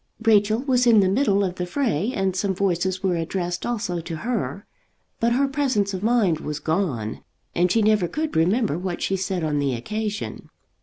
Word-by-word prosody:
Rachel 215 -1 +4
was 250 -3 +2
in 225 -3 +7
the 195 - +4
middle 200 -1 +2
of 185 -2 -2
the 180 - -2
fray, 225 - 0
and 195 -6 -1
some 190 0 0
voices 185 0 0
were 185 -2 +2
addressed 175 +1 -3
also 210 -7 -2
to 165 0 -6
her; 210 +1 -3 0.5
but 235 +1 +2
her 275 +3 +2
presence 265 -8 0
of 185 - -4
mind 215 -8 +2
was 150 -2 -4
gone, 155 - -2 0.3
and 175 +1 +2
she 225 +1 +3
never 210 -4 +3
could 310 - -3
remember 180 - +2
what 180 -1 -3
she 195 - 0
said 185 -2 -2
on 150 -2 0
the 140 -3 0
occasion. 210 - -4
195 Hz, 190 wpm, -23 LUFS, 175-220 Hz, 0.5 s, in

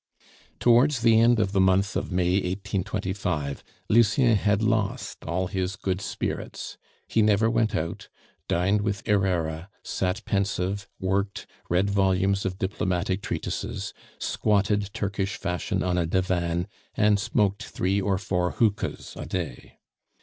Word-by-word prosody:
Towards 125 +2 +4
the 115 -1 +5
end 120 0 +5
of 100 -3 +1
the 100 -2 +3
month 95 +1 +3
of - - -2
May 90 +1 +2
1825 95 -5 -2 0.2
Lucien 115 +2 +4
had 105 +1 +2
lost 110 +1 -1
all 90 +3 -1
his 95 0 -2
good 95 0 -2
spirits; - - -4 0.3
he 115 - +2
never 105 +1 +3
went 115 -2 +1
out, 80 +1 -3 0.4
dined 100 +4 +2
with 105 0 -2
Herrera, 90 -4 0
sat 95 +3 -2
pensive, 100 0 -1
worked, 100 +1 -1 0.2
read 95 +3 +2
volumes 95 0 +2
of 90 -1 -4
diplomatic 95 0 -1
treatises, - - -4 0.2
squatted 105 -1 +1
Turkish 100 -1 -2
fashion 90 -2 -2
on 90 -1 +1
a 85 - 0
divan, 90 -1 0 0.3
and 105 -1 +4
smoked 100 -1 +1
three 95 +2 -1
or 95 0 +1
four 90 -2 -1
hookahs 110 -3 -1
a - - -6
day. 85 -10 -5
100 Hz, 135 wpm, -26 LUFS, 90-105 Hz, 0.4 s, the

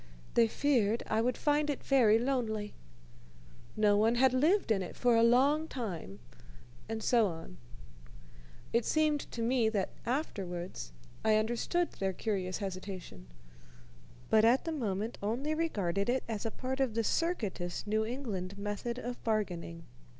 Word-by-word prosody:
They 235 -1 +5
feared 235 -4 +1
I 220 - +1
would 245 +1 0
find 295 0 +1
it 285 - -3
very 235 -6 +5
lonely. 225 -4 -1 1.0
No 210 -1 +4
one 225 +3 +3
had 260 +1 +4
lived 310 - +3
in 200 -3 +2
it 180 - -6
for 245 -1 +3
a 230 - +5
long 275 +7 +4
time, 180 - -5 0.7
and 220 -1 -3
so 235 -4 +4
on. 165 - -8 1.2
It 235 - +3
seemed 305 +1 +2
to 230 - -3
me 235 -1 +2
that 200 -4 -1
afterwards 185 - -3 0.3
I 220 -1 +4
understood 240 +11 0
their 190 -1 -2
curious 185 -2 -2
hesitation, 185 - -6 1.0
but 220 -1 +6
at 240 +4 +4
the 330 - -1
moment 220 -6 -2
only 245 +9 -1
regarded 200 - -1
it 260 +2 +1
as 225 -1 -3
a - - -1
part 260 +4 -4
of 260 -5 0
the 230 - +1
circuitous 210 - -1
New 215 +1 +1
England 215 -6 -4
method 205 +4 -3
of 245 0 -6
bargaining. 175 -7 -2
225 Hz, 150 wpm, -32 LUFS, 200-255 Hz, 1.2 s, but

